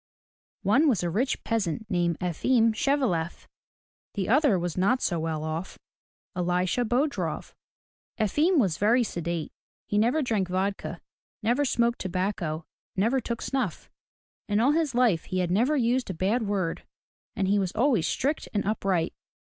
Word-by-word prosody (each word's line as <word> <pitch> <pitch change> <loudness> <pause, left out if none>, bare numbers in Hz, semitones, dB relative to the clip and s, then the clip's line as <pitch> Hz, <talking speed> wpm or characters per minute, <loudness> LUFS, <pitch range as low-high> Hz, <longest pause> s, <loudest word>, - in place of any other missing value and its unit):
One 270 +10 +4
was 215 -9 +1
a 175 - -1
rich 245 +9 -1
peasant 220 -3 -1
named 175 -3 0
E'fim 225 +6 +2
Shev'e 275 +4 +1
lef. 170 -3 -3 0.7
The 195 -2 -2
other 265 -4 +4
was 175 -2 -3
not 200 +8 +2
so 175 -8 0
well 160 -1 -2
off 160 +4 -4 0.3
— - - -58
E - - -4
li'sha 180 +6 +1
Bo'drof. 270 +6 -1 0.7
Efim 300 - +2
was 190 - +2
very 235 +5 +4
sedate. 170 -5 -3 0.3
He 205 - 0
never 245 +8 +2
drank 215 -7 0
vodka, 190 +2 -2 0.4
never 245 +6 +2
smoked 235 -2 +1
tobacco, 180 -4 -2 0.3
never 230 +7 +2
took 235 0 -4
snuff. 270 -1 -3 0.6
In 205 0 +2
all 250 +5 +4
his 310 -4 0
life 235 -10 +3
he 185 - -3
had 180 -1 0
never 245 +11 +2
used 245 -1 +1
a 190 - -3
bad 210 +6 0
word, 190 -5 -1 0.5
and 195 -4 0
he 200 +1 +3
was 190 -2 -1
always 230 - +2
strict 290 +4 -1
and 205 - +1
upright. 195 -5 0
205 Hz, 160 wpm, -27 LUFS, 180-245 Hz, 0.7 s, One